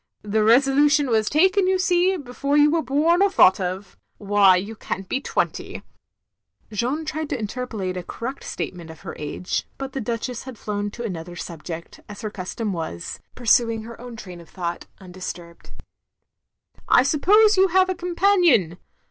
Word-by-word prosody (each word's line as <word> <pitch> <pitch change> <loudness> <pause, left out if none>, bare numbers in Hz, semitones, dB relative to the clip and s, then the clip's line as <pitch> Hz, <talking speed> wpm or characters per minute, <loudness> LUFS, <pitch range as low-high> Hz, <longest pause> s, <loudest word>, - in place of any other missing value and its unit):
The 210 +1 +1
resolution 275 +4 +4
was 220 -1 +2
taken, 375 +5 +3
you 375 0 +3
see, 365 +1 +2
before 280 0 -2
you 295 0 +5
were 330 0 +2
bom 310 +7 +2
or 400 - +5
thought 190 - +5
of. 185 +2 -4 0.2
Why 200 -2 +4
you 200 +5 -3
can't 195 -2 -5
be 265 - -2
twenty." - - -3 0.9
Jeanne 255 +9 -2
tried 310 -1 -4
to 280 - -1
interpolate 215 -4 -4
a 180 - -3
correct 240 +9 -6
statement 170 -3 -6
of 160 - -12
her - - -7
age, 150 +4 -3
but 270 -1 -6
the 270 - -3
Duchess 235 +2 -4
had 260 -3 -9
flown 205 0 -3
to 235 +3 -8
another 175 -5 -6
subject, 170 0 -8
as 205 - -9
her 215 - -4
custom 205 +2 -4
was, 160 - -5 0.2
pursu 235 -1 +3
ing 225 -1 -4
her 230 +1 -10
own 245 -1 -9
train 180 -5 -10
of 165 - -17
thought 175 -2 -5
tmdisturbed. 180 -2 -9 1.2
"I - - +6
suppose 415 +10 +4
you 380 0 +5
have 375 +1 +3
a 375 - 0
companion. 345 - +2
230 Hz, 170 wpm, -23 LUFS, 190-295 Hz, 1.2 s, I